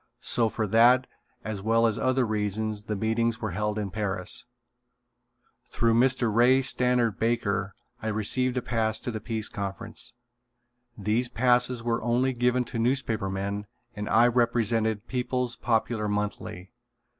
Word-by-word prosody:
So 115 Hz, -2 st, +1 dB
for 110 Hz, 0 st, -2 dB
that 120 Hz, +5 st, +5 dB, 0.4 s
as 110 Hz, -3 st, -4 dB
well 115 Hz, +2 st, +3 dB
as 110 Hz, -2 st, +1 dB
other 130 Hz, 0 st, +2 dB
reasons 105 Hz, 0 st, -2 dB
the 110 Hz, -, -2 dB
meetings 115 Hz, +2 st, 0 dB
were 110 Hz, -3 st, -3 dB
held 105 Hz, +3 st, -2 dB
in 105 Hz, -3 st, -3 dB
Paris. 95 Hz, -3 st, -3 dB, 1.2 s
Through 115 Hz, -1 st, +1 dB
Mr. 120 Hz, -1 st, +2 dB
Ray 125 Hz, +4 st, +5 dB
Stannard 125 Hz, -4 st, +1 dB
Baker 105 Hz, -4 st, 0 dB, 0.3 s
I 110 Hz, -, -4 dB
received 125 Hz, +4 st, 0 dB
a 125 Hz, -, -1 dB
pass 110 Hz, -2 st, 0 dB
to 120 Hz, -, -3 dB
the 110 Hz, -, -4 dB
Peace 110 Hz, -1 st, -3 dB
Conference. 110 Hz, +3 st, -5 dB, 0.8 s
These 110 Hz, +4 st, 0 dB
passes 125 Hz, 0 st, +2 dB
were 115 Hz, -1 st, 0 dB
only 125 Hz, +3 st, +1 dB
given 125 Hz, +1 st, +1 dB
to 115 Hz, 0 st, -5 dB
newspaper 115 Hz, -5 st, 0 dB
men 100 Hz, +2 st, -3 dB, 0.3 s
and 105 Hz, 0 st, -4 dB
I 115 Hz, +3 st, +5 dB
represented 115 Hz, -2 st, +1 dB
People's 125 Hz, -1 st, -2 dB
Popular 110 Hz, -2 st, 0 dB
Monthly. 105 Hz, -3 st, -4 dB
115 Hz, 145 wpm, -27 LUFS, 105-120 Hz, 1.2 s, that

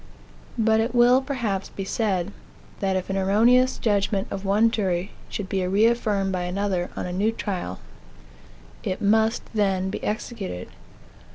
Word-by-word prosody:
But 220 Hz, 0 st, +3 dB
it 230 Hz, +2 st, -1 dB
will, 245 Hz, +2 st, +6 dB
perhaps, 235 Hz, -8 st, -2 dB
be 195 Hz, -, -6 dB
said, 195 Hz, -3 st, -1 dB, 0.5 s
that 195 Hz, -1 st, 0 dB
if 185 Hz, +1 st, -2 dB
an 195 Hz, -, -1 dB
erroneous 230 Hz, +7 st, +4 dB
judgment 200 Hz, -2 st, 0 dB
of 195 Hz, -, -4 dB
one 210 Hz, +4 st, +3 dB
jury 190 Hz, -4 st, -1 dB, 0.2 s
should 205 Hz, -, -4 dB
be 190 Hz, -1 st, -1 dB
reaffirmed 205 Hz, -1 st, +2 dB
by 185 Hz, -1 st, -1 dB
another, 185 Hz, -1 st, -1 dB
on -, -, -3 dB
a 180 Hz, -, -4 dB
new 205 Hz, +5 st, +1 dB
trial, 185 Hz, -, -4 dB, 1.0 s
it 185 Hz, -, -3 dB
must 220 Hz, +2 st, +2 dB
then 190 Hz, -3 st, +1 dB
be -, -, -5 dB
executed. 210 Hz, -, -4 dB
200 Hz, 150 wpm, -24 LUFS, 190-225 Hz, 1.0 s, will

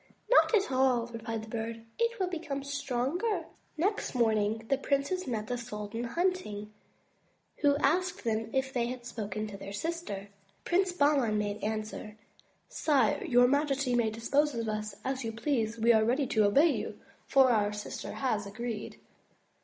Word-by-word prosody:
"Not -, -, +6 dB
at 400 Hz, -8 st, +1 dB
all," 255 Hz, -2 st, +3 dB
replied 225 Hz, -1 st, -5 dB
the -, -, -10 dB
Bird. 225 Hz, 0 st, -4 dB
"It 465 Hz, 0 st, +1 dB
will 375 Hz, -, +2 dB
become 315 Hz, -6 st, -4 dB
stronger." 280 Hz, -, -1 dB, 0.3 s
Next 390 Hz, -1 st, 0 dB
morning 220 Hz, -2 st, +1 dB
the 275 Hz, +2 st, +1 dB
princes 280 Hz, +7 st, 0 dB
met 220 Hz, -4 st, -2 dB
the 245 Hz, 0 st, -3 dB
sultan 215 Hz, +1 st, -5 dB
hunting, 235 Hz, -, -2 dB, 0.8 s
who 285 Hz, -1 st, +3 dB
asked 360 Hz, +6 st, +1 dB
them 225 Hz, -1 st, -1 dB
if 265 Hz, 0 st, -1 dB
they 235 Hz, -2 st, +1 dB
had 245 Hz, 0 st, -6 dB
spoken 215 Hz, -3 st, -4 dB
to 205 Hz, -2 st, -7 dB
their 195 Hz, -, -8 dB
sister. 205 Hz, -, -4 dB, 0.4 s
Prince 370 Hz, +1 st, +2 dB
Bahman 285 Hz, -9 st, +3 dB
made 205 Hz, 0 st, -2 dB
answer: 215 Hz, 0 st, -4 dB, 0.5 s
"Sire, 270 Hz, -8 st, +2 dB
your 245 Hz, 0 st, +5 dB
majesty 280 Hz, -1 st, +1 dB
may 235 Hz, -2 st, +3 dB
dispose 275 Hz, +6 st, +1 dB
of 230 Hz, -1 st, -2 dB
us 215 Hz, -1 st, -3 dB
as 265 Hz, -1 st, -2 dB
you 225 Hz, -, -2 dB
please; 230 Hz, -1 st, -1 dB
we 230 Hz, +1 st, +5 dB
are 220 Hz, -1 st, +4 dB
ready 255 Hz, +5 st, +2 dB
to 220 Hz, -4 st, +2 dB
obey 285 Hz, +11 st, +5 dB
you, -, -, -4 dB, 0.3 s
for 265 Hz, -2 st, +5 dB
our 210 Hz, -3 st, +2 dB
sister 210 Hz, 0 st, -6 dB
has 220 Hz, -7 st, -1 dB
agreed." 225 Hz, +1 st, -5 dB
240 Hz, 160 wpm, -30 LUFS, 220-285 Hz, 0.8 s, Not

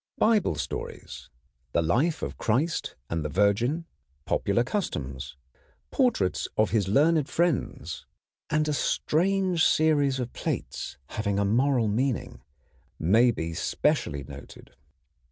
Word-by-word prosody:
Bible 215 Hz, -, +3 dB
stories, 75 Hz, -3 st, -6 dB, 0.4 s
the 85 Hz, -, +2 dB
life 140 Hz, -, +1 dB
of -, -, -5 dB
Christ 140 Hz, +10 st, 0 dB
and 80 Hz, 0 st, -2 dB
the 75 Hz, -, -3 dB
Virgin, 105 Hz, -, +1 dB, 0.4 s
popular 100 Hz, +4 st, +1 dB
customs, 70 Hz, -, -4 dB, 0.5 s
portraits 240 Hz, -, +1 dB
of 110 Hz, -, +3 dB
his 105 Hz, -4 st, +1 dB
learned 150 Hz, +7 st, +3 dB
friends, 170 Hz, -5 st, -1 dB, 0.4 s
and 155 Hz, 0 st, +1 dB
a 150 Hz, -, 0 dB
strange 180 Hz, +4 st, +1 dB
series 145 Hz, -4 st, +3 dB
of 125 Hz, -1 st, -4 dB
plates -, -, -4 dB
having 100 Hz, -2 st, -2 dB
a 100 Hz, -, +2 dB
moral 120 Hz, +2 st, +2 dB
meaning 120 Hz, +3 st, -1 dB, 0.6 s
may 110 Hz, +10 st, +4 dB
be 85 Hz, -8 st, -2 dB
specially 70 Hz, -3 st, 0 dB
noted. -, -, -12 dB
120 Hz, 120 wpm, -27 LUFS, 100-155 Hz, 0.6 s, may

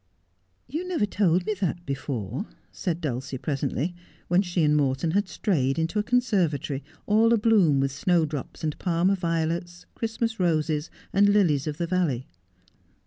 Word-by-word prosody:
' 90 Hz, +1 st, -44 dB
You 355 Hz, +3 st, -2 dB
never 345 Hz, -, +1 dB
told 185 Hz, -3 st, +1 dB
me 215 Hz, -, 0 dB
that 175 Hz, -1 st, -1 dB
before,' 135 Hz, -, -3 dB, 0.2 s
said 175 Hz, -3 st, -3 dB
Dulcie 130 Hz, -2 st, -3 dB
presently, 140 Hz, +4 st, -2 dB, 0.4 s
when 180 Hz, +2 st, +4 dB
she 175 Hz, -3 st, 0 dB
and 150 Hz, 0 st, +4 dB
Morton 140 Hz, +2 st, +1 dB
had 200 Hz, +2 st, +1 dB
strayed 135 Hz, -, 0 dB
into 165 Hz, +6 st, 0 dB
a -, -, +1 dB
conservatory 185 Hz, -, 0 dB, 0.2 s
all 220 Hz, +2 st, +4 dB
abloom 205 Hz, -10 st, +4 dB
with 135 Hz, 0 st, +1 dB
snowdrops 155 Hz, -1 st, -1 dB
and 155 Hz, -1 st, -2 dB
Parma 180 Hz, +2 st, +2 dB
violets, 170 Hz, 0 st, -2 dB
Christmas 225 Hz, 0 st, -2 dB
roses, 155 Hz, -3 st, +1 dB, 0.2 s
and 205 Hz, +1 st, +5 dB
lilies 170 Hz, -9 st, +3 dB
of 150 Hz, -1 st, -3 dB
the 170 Hz, -, -1 dB
valley. 165 Hz, -8 st, 0 dB
170 Hz, 150 wpm, -26 LUFS, 145-200 Hz, 0.4 s, and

